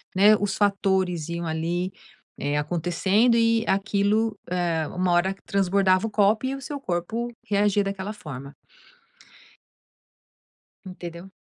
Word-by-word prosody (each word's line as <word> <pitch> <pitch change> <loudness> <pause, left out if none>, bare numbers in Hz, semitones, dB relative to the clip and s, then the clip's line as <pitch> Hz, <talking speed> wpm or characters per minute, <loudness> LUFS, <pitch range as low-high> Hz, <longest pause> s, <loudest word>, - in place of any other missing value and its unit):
né, 205 +3 +7
os 200 -1 -1
fatores 190 -5 +1
iam 170 0 -3
ali, 170 +3 -2 0.5
eh, 145 +1 -1
acontecendo 175 +9 +2
e 230 -1 +3
aquilo, 205 +2 +1
eh, 170 -3 0
uma 180 0 0
hora 180 +2 +2
que 195 - -24
transbordava 195 0 +2
o - - -5
copo 210 +3 +2
e 260 - -1
o 275 - -8
seu 285 +2 -5
corpo 215 +3 -2 0.2
reagia 205 0 +2
daquela 195 +1 -4
forma. 140 -7 -9 2.3
Entendeu? 175 0 -8
190 Hz, 125 wpm, -25 LUFS, 175-210 Hz, 2.3 s, né